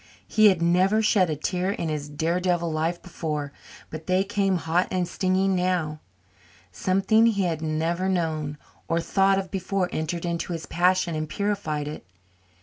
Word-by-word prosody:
He 215 -1 +5
had 185 -4 +3
never 185 +6 +3
shed 195 -4 +3
a 155 - -1
tear 180 +5 -1
in 195 -4 -2
his 150 -1 -3
daredevil 170 +2 0
life 160 +2 -1
before, 150 -5 -4 0.4
but 155 0 -8
they 185 +1 +3
came 195 -1 0
hot 170 +2 +1
and 180 -2 -1
stinging 190 +1 +1
now. 180 -4 0 0.7
Something 195 - +3
he 200 -4 +1
had 165 -3 -1
never 165 +4 -1
known 155 -5 -1 0.3
or 165 - +1
thought 195 +3 +2
of 190 -1 -3
before 190 -1 -1
entered 165 +2 -3
into 170 +1 -2
his 165 -1 -5
passion 180 0 +2
and 155 0 -3
purified 160 -7 -2
it. 150 - -7
175 Hz, 160 wpm, -25 LUFS, 160-190 Hz, 0.7 s, He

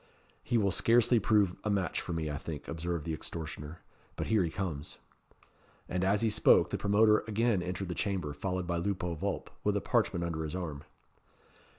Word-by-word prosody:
"He 120 - +1
will 100 -3 +2
scarcely 120 +4 +4
prove 100 -3 +3
a 110 - -1
match 95 -5 0
for - - -6
me, 80 -2 -2
I 70 - -3
think," 75 -1 -7
observed 85 -1 -3
the 80 - -2
extortioner 80 0 -6 0.3
"but - - -3
here 110 -4 +3
he 85 - -1
comes." 80 -5 -4 0.9
And 90 0 -1
as 100 +2 +2
he 115 - +3
spoke, 105 - +5
the - - 0
promoter 105 +1 +4
again 110 -2 +1
entered 90 +2 -3
the - - -1
chamber, 90 -7 -2
followed 90 +4 -2
by 85 -1 -1
Lupo 90 -1 -1
Vulp, 80 - -3
with - - +2
a - - -1
parchment 85 0 +1
under 80 -2 -3
his 80 +2 -4
arm. 75 -5 -5
90 Hz, 190 wpm, -31 LUFS, 80-100 Hz, 0.9 s, spoke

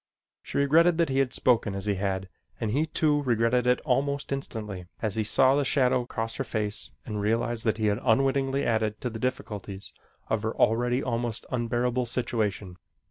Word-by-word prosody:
She - - -5
regretted 160 +4 +4
that 170 -3 +2
he 135 0 +1
had 135 -2 +2
spoken 115 -5 +2
as 100 0 -4
he 105 - +1
had 95 -1 -2 0.3
and 110 - -1
he, 150 +7 +1
too, 150 -1 +1
regretted 120 -1 +2
it 125 0 +4
almost 140 +1 0
instantly 105 -9 -5
as 110 -3 -1
he 110 - +1
saw 130 +5 +4
the 145 +1 +2
shadow 125 -3 +2
cross 115 -1 -3
her - - -1
face 105 - -2
and 105 -1 -3
realized 115 +2 0
that 110 -1 +1
he 110 - -1
had 105 +1 +1
unwittingly 135 +3 +2
added 110 -2 0
to 125 - -2
the 110 - -6
difficulties 105 -5 -4 0.3
of 110 - 0
her 110 +1 -2
already 120 +3 +2
almost 120 -3 -2
unbearable 125 0 0
situation. 105 -6 -2
120 Hz, 185 wpm, -27 LUFS, 110-135 Hz, 0.3 s, regretted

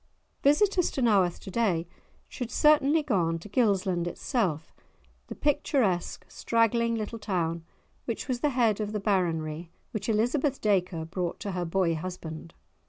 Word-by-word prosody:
Visitors 360 +5 +3
to - - -5
Naworth 195 -6 +3
to 190 - -8
day 185 -7 +1 0.4
should 245 -3 -6
certainly 300 +2 +4
go 265 -8 0
on 165 -1 0
to 165 - -10
Gilsland 195 -6 +1
itself, 175 - -2 0.5
the - - -7
picturesque 260 - 0
straggling 230 0 +1
little 225 +1 -4
town, 170 -5 -2 0.4
which - - -4
was 250 -3 -1
the 295 - +1
head 235 -6 +2
of 210 0 -3
the 210 - -1
Baronry 170 -5 -1 0.2
which 215 -2 -4
Elizabeth 255 +6 +1
Dacre 180 -5 0
brought 175 +1 -3
to 200 - -3
her 180 -1 -2
boy 170 0 +1
husband. 165 -1 -7
205 Hz, 150 wpm, -28 LUFS, 175-240 Hz, 0.5 s, certainly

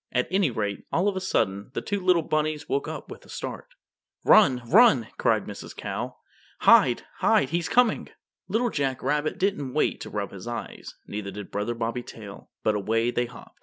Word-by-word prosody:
At 125 0 +1
any 190 -4 +3
rate, 105 -4 -3
all 180 +4 +2
of 200 - +1
a 190 - -2
sudden, 100 - 0
the - - -1
two 205 -1 -1
little 180 -3 +3
rabbits 155 0 -1
woke 410 0 -1
up - - -7
with - - -10
a - - -19
start. - - -6 0.6
"Run, 130 - +6
run!" 150 - +5
cried - - +2
Mrs. - - -8
Cow. - - -5 0.4
"Hide, - - +6
hide! 135 - +3
He's 170 0 -1
coming!" 245 -3 +2 0.4
Little 225 +5 0
Jack 135 -3 -1
Rabbit 150 +1 0
didn't 150 -10 -1
wait 155 - +1
to - - -6
rub 100 -1 -3
his 100 +3 -9
eyes, 120 0 -6
neither 105 -1 -5
did 100 0 -8
Brother 105 +4 -2
Bobby 115 +1 -2
Tail, 105 -4 -11
but 110 - +2
away 115 +3 0
they 120 0 0
hopped. 125 - -14
130 Hz, 190 wpm, -26 LUFS, 110-185 Hz, 0.6 s, Run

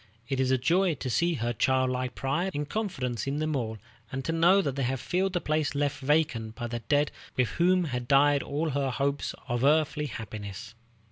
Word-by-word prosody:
It 135 0 -2
is 130 -1 +2
a 130 - +4
joy 170 +6 +2
to 130 -2 -4
see 170 +6 +2
her 120 -2 -1
childlike 130 +1 +1
pride 150 +8 -1
and 145 0 -2
confidence 135 - -3
in 140 +1 -1
them 155 0 -1
all, 110 -4 -2 0.3
and 135 0 -4
to - - 0
know 170 +4 +5
that 140 -5 -2
they 140 - -2
have 130 0 0
filled 185 +8 0
the 175 - +1
place 155 -1 0
left 145 0 0
vacant 135 -6 +1
by 120 - -5
the 120 0 -3
dead 145 +4 +1 0.3
with 125 -2 +2
whom 180 +1 +3
had 125 -6 -3
died 145 +1 +5
all 155 +2 -2
her 140 0 0
hopes 140 +2 -1
of 120 0 -1
earthly 150 +1 +2
happiness. 105 -2 -7
140 Hz, 205 wpm, -28 LUFS, 125-155 Hz, 0.3 s, know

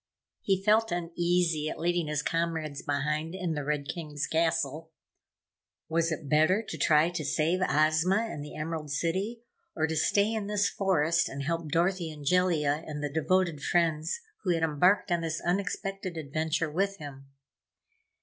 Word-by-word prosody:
He 195 -2 +1
felt 220 +2 +3
uneasy 170 -2 0
at - - -5
leaving 175 -1 0
his 150 0 -1
comrades 160 -4 -2
behind 150 +4 -2
in 180 -3 -2
the 150 -2 -3
Red 145 -1 -2
King's 150 -4 -4
Castle. 160 -1 0 1.0
Was 165 +1 +1
it 155 -2 -4
better 155 +9 +3
to - - -4
try 155 +2 +3
to 175 -3 -3
save 160 +5 +1
Ozma 155 +6 +3
and 220 -10 -3
the 150 - -9
Emerald 155 -1 -4
City, 190 +11 -2 0.3
or 160 - +1
to 160 0 -2
stay 200 +7 +2
in 215 -2 -2
this 210 0 +1
forest 170 -4 +1
and 140 +1 -5
help 165 +1 -2
Dorothy 175 +1 +1
and 150 -2 -10
Jellia 160 -3 +2
and 150 -1 -5
the 145 -1 -3
devoted 170 -1 +1
friends 165 - +1 0.2
who 180 -4 +1
had 165 - -1
embarked 175 +6 +3
on 170 -1 +2
this 165 -1 -2
unexpected 195 0 -2
adventure 160 +2 -1
with 195 +4 0
him? 135 -4 -10
165 Hz, 160 wpm, -29 LUFS, 150-180 Hz, 1.0 s, felt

